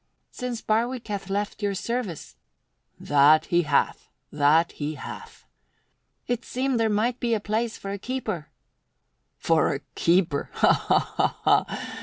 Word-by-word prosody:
"Since 250 -2 -5
Barwick 235 +3 0
hath 200 -2 -4
left 205 +2 -2
your 200 -1 0
service 190 - -4 0.3
" - - -46
"That 145 +2 +6
he 175 0 +2
hath, 150 -4 0 0.2
that 150 +3 +3
he 150 +1 -4
hath!" - - -10 0.8
"It 245 0 -2
seemed 255 -1 -1
there 225 -1 +2
might 230 +4 0
be 235 -2 +1
a - - -1
place 220 +2 -2
for 195 - -6
a 200 - -4
keeper." 215 - -4 0.9
"For 160 -3 +2
a 140 - -6
keeper? 170 -4 +1
Ha, - - +4
ha, - - +1 0.2
ha! - - +1
200 Hz, 145 wpm, -25 LUFS, 155-235 Hz, 0.9 s, That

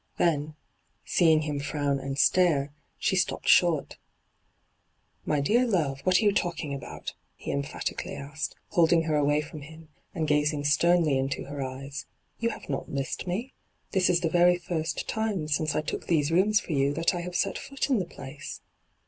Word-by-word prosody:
Then, 155 -2 +1 0.5
seeing 160 -3 +4
him 150 -2 -2
frown 140 -1 -1
and 135 0 -4
stare, 150 -4 +3 0.2
she - - +1
stopped - - 0
short. - - +3 0.6
' - - -43
My 150 - +2
dear 230 - +3
love, 155 - 0
what 185 -1 +4
are - - 0
you 205 - +6
talking 170 -7 -2
about 140 - -6 0.3
V - - -20
he - - -2
emphatically 140 0 -3
asked, 145 +2 -5
holding 165 -1 +4
her 155 -1 0
away 145 0 +2
from 150 0 -9
him, 160 +2 -12 0.3
and 160 -3 -1
gazing 150 0 +1
sternly 155 -1 +3
into 135 +1 -2
her 140 0 -6
eyes. 135 +2 -6 0.2
' - - -44
You 230 - +1
have - - -8
not 135 - -3
missed 140 +6 -3
me. 220 +9 -3 0.4
This 185 -2 +3
is 175 -1 +3
the 170 - +1
very 175 +1 +5
first 165 -3 -3
time 215 -8 -1
since 155 0 0
I - - +2
took 150 - -5
these 155 -3 +2
rooms 205 +5 +4
for 185 - -8
you 140 0 +1
that 165 +3 +2
I 175 - -3
have 180 0 -6
set 195 - 0
foot 275 0 -3
in 250 - +4
the 185 - -1
place.' 140 -3 -9
155 Hz, 190 wpm, -27 LUFS, 145-175 Hz, 0.6 s, you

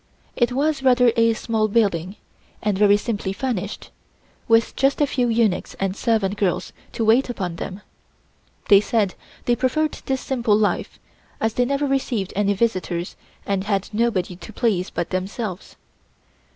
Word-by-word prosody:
It 240 0 +2
was 285 +2 0
rather 250 -2 +5
a 230 0 +4
small 220 -1 0
building, 200 -4 +1 0.5
and 210 -2 +1
very 205 +1 +5
simply 205 -3 -3
furnished, 205 -4 -4 0.6
with 225 0 +3
just 275 +1 +2
a 295 - +4
few 255 -3 0
eunuchs 225 -5 +1
and 195 -1 -2
servant 210 -3 0
girls 195 -4 -1 0.2
to 225 - -1
wait 235 +5 +4
upon 185 -8 -4
them. 190 +4 -6 0.9
They 200 -1 +7
said 210 -3 0 0.3
they 240 - +3
preferred 275 +5 +1 0.2
this 265 -1 0
simple 235 -6 +1
life, 215 -1 -1 0.4
as 220 0 0
they 245 - +2
never 280 +2 0
received 260 -8 -1
any 205 0 +2
visitors 185 -5 -1 0.3
and 195 -1 -1
had 200 -2 -1
nobody 210 -5 0
to 180 +4 -10
please 200 -5 0
but 175 - -4
themselves. 190 +1 -4
220 Hz, 150 wpm, -22 LUFS, 195-245 Hz, 0.9 s, They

